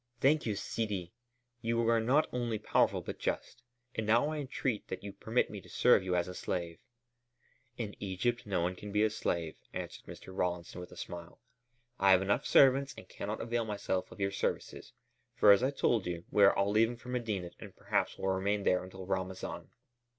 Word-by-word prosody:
"Thank 145 Hz, +1 st, +3 dB
you, 105 Hz, -, 0 dB
Sidi! 100 Hz, -3 st, -3 dB, 0.5 s
You 115 Hz, 0 st, +1 dB
are 115 Hz, 0 st, +4 dB
not 130 Hz, +7 st, +3 dB
only 120 Hz, -3 st, -1 dB
powerful, -, -, +2 dB
but -, -, -6 dB
just. 120 Hz, -, -3 dB, 0.3 s
And 110 Hz, -, -3 dB
now 120 Hz, +7 st, +4 dB
I 155 Hz, -, -3 dB
entreat 130 Hz, -4 st, -2 dB
that 95 Hz, -, -6 dB
you 100 Hz, -1 st, -6 dB
permit 115 Hz, +3 st, 0 dB
me 105 Hz, -2 st, -7 dB
to -, -, -17 dB
serve 125 Hz, -4 st, +5 dB
you 90 Hz, -1 st, 0 dB
as 90 Hz, 0 st, +1 dB
a 90 Hz, -, -6 dB
slave." 85 Hz, -2 st, -3 dB, 1.0 s
"In 110 Hz, -4 st, -4 dB
Egypt 115 Hz, +5 st, -1 dB
no 95 Hz, -4 st, 0 dB
one 90 Hz, +2 st, -1 dB
can 105 Hz, +3 st, -8 dB
be 105 Hz, +1 st, +3 dB
a 110 Hz, -, +2 dB
slave," 85 Hz, -6 st, -2 dB, 0.2 s
answered -, -, -6 dB
Mr. 95 Hz, -, -10 dB
Rawlinson 90 Hz, -1 st, -2 dB
with 90 Hz, -, -10 dB
a -, -, -12 dB
smile. 85 Hz, -1 st, -8 dB, 0.6 s
"I 95 Hz, -, +4 dB
have 95 Hz, 0 st, +6 dB
enough 100 Hz, +7 st, +1 dB
servants 135 Hz, 0 st, +5 dB
and 95 Hz, -, -11 dB
cannot 105 Hz, +3 st, -5 dB
avail 120 Hz, 0 st, -1 dB
myself 100 Hz, -3 st, -2 dB
of -, -, -12 dB
your 100 Hz, 0 st, 0 dB
services; 100 Hz, -, -3 dB, 0.4 s
for, 105 Hz, -, +7 dB
as 100 Hz, -, +6 dB
I 130 Hz, -, +2 dB
told 120 Hz, -7 st, +1 dB
you, 85 Hz, -1 st, -4 dB
we 100 Hz, -, +6 dB
all -, -, +7 dB
are 100 Hz, 0 st, +1 dB
leaving 115 Hz, +3 st, +2 dB
for 120 Hz, +2 st, -12 dB
Medinet 110 Hz, -8 st, -2 dB
and -, -, -10 dB
perhaps -, -, -1 dB
will 95 Hz, -, -1 dB
remain 100 Hz, +2 st, 0 dB
there 90 Hz, -1 st, +2 dB
until 95 Hz, 0 st, -9 dB
Ramazan." 95 Hz, 0 st, -4 dB
100 Hz, 200 wpm, -32 LUFS, 95-115 Hz, 1.0 s, for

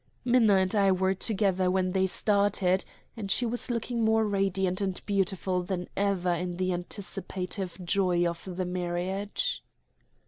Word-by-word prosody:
Minna 240 Hz, -5 st, +5 dB
and 190 Hz, -1 st, +2 dB
I 200 Hz, -2 st, +4 dB
were 190 Hz, +1 st, +2 dB
together 190 Hz, -2 st, +1 dB
when 185 Hz, 0 st, +1 dB
they 190 Hz, 0 st, +2 dB
started, 200 Hz, -2 st, +1 dB, 0.3 s
and 210 Hz, -4 st, -5 dB
she 245 Hz, -, +2 dB
was 240 Hz, +2 st, -1 dB
looking 235 Hz, 0 st, -1 dB
more 220 Hz, 0 st, +3 dB
radiant 195 Hz, -2 st, 0 dB
and 190 Hz, -2 st, -1 dB
beautiful 190 Hz, -2 st, 0 dB
than 180 Hz, 0 st, -4 dB
ever 190 Hz, -3 st, +1 dB
in 175 Hz, 0 st, -3 dB
the 185 Hz, 0 st, 0 dB
anticipative 185 Hz, 0 st, -4 dB
joy 180 Hz, -2 st, +2 dB
of 170 Hz, -1 st, -5 dB
the 180 Hz, +1 st, -3 dB
marriage. 185 Hz, -, -2 dB
190 Hz, 145 wpm, -28 LUFS, 180-205 Hz, 0.3 s, Minna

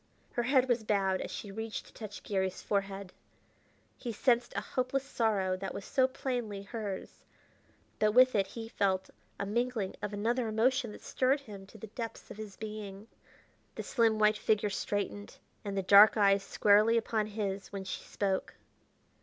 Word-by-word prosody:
Her 240 Hz, -, 0 dB
head 260 Hz, +1 st, +3 dB
was 240 Hz, -3 st, +1 dB
bowed 195 Hz, -3 st, +1 dB
as -, -, -4 dB
she 205 Hz, -, -6 dB
reached 220 Hz, +2 st, -5 dB
to -, -, -17 dB
touch 210 Hz, -2 st, -8 dB
Garry's 190 Hz, -2 st, -1 dB
forehead. 195 Hz, -2 st, -2 dB, 0.9 s
He 240 Hz, -, -4 dB
sensed 240 Hz, +2 st, +2 dB
a 200 Hz, -, 0 dB
hopeless 255 Hz, +1 st, 0 dB
sorrow 210 Hz, -8 st, 0 dB
that 190 Hz, +1 st, -5 dB
was 195 Hz, -, -6 dB
so 260 Hz, -1 st, +3 dB
plainly 245 Hz, -6 st, -3 dB
hers, 205 Hz, -2 st, -6 dB, 0.8 s
but 210 Hz, 0 st, +3 dB
with 255 Hz, +2 st, +7 dB
it 195 Hz, -2 st, +2 dB
he 225 Hz, +3 st, -7 dB
felt 190 Hz, -4 st, 0 dB, 0.3 s
a -, -, -1 dB
mingling 230 Hz, -1 st, -1 dB
of 210 Hz, -, -3 dB
another 230 Hz, +4 st, 0 dB
emotion 235 Hz, +2 st, +1 dB
that -, -, -12 dB
stirred 265 Hz, +2 st, +1 dB
him 200 Hz, -6 st, -10 dB
to 220 Hz, -, -14 dB
the 220 Hz, -, -8 dB
depths 225 Hz, +2 st, -7 dB
of -, -, -9 dB
his 215 Hz, -3 st, -8 dB
being. 210 Hz, -1 st, -7 dB, 0.7 s
The -, -, -4 dB
slim, 225 Hz, -3 st, +2 dB
white 215 Hz, 0 st, +3 dB
figure 210 Hz, -1 st, +1 dB
straightened, 205 Hz, +1 st, -3 dB, 0.3 s
and 200 Hz, -2 st, -4 dB
the 195 Hz, -, 0 dB
dark 205 Hz, +4 st, +8 dB
eyes 200 Hz, -1 st, +5 dB
squarely 210 Hz, +3 st, +4 dB
upon 220 Hz, -2 st, 0 dB
his 200 Hz, -2 st, -4 dB
when 195 Hz, -1 st, -5 dB
she 190 Hz, -, -5 dB
spoke. 195 Hz, -2 st, -2 dB
210 Hz, 170 wpm, -31 LUFS, 200-230 Hz, 0.9 s, dark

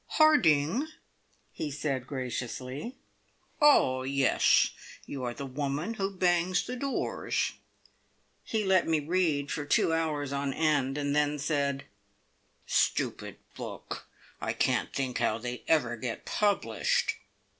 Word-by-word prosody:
"Harding?" 245 Hz, -, +4 dB, 0.6 s
he 155 Hz, -, -4 dB
said 135 Hz, -3 st, -3 dB
graciously. 130 Hz, -, -4 dB, 0.7 s
"Oh, 130 Hz, -, +5 dB
yes! 135 Hz, 0 st, +3 dB, 0.3 s
You 135 Hz, -2 st, -6 dB
are 120 Hz, -, -2 dB
the 140 Hz, -, -5 dB
woman 145 Hz, -, -2 dB
who 195 Hz, -3 st, -1 dB
bangs 180 Hz, -1 st, +1 dB
the 250 Hz, -, -4 dB
doors." 275 Hz, +2 st, -1 dB, 0.9 s
He 220 Hz, -1 st, -1 dB
let 190 Hz, -2 st, +3 dB
me 160 Hz, -1 st, +2 dB
read 150 Hz, -3 st, 0 dB
for 145 Hz, -, -2 dB
two 145 Hz, +2 st, +2 dB
hours 150 Hz, -4 st, -1 dB
on 140 Hz, -1 st, -2 dB
end, 145 Hz, -4 st, +1 dB
and 145 Hz, 0 st, -1 dB
then 150 Hz, 0 st, +2 dB
said, 140 Hz, -2 st, -1 dB, 0.8 s
"Stupid -, -, 0 dB, 0.2 s
book. -, -, -7 dB, 0.3 s
I -, -, -1 dB
can't -, -, +1 dB
think 130 Hz, -3 st, -2 dB
how 110 Hz, -, +1 dB
they 125 Hz, +1 st, -5 dB
ever 130 Hz, -7 st, +2 dB
get 120 Hz, -1 st, -5 dB
published!" 215 Hz, -, +1 dB
145 Hz, 125 wpm, -29 LUFS, 135-180 Hz, 0.9 s, Oh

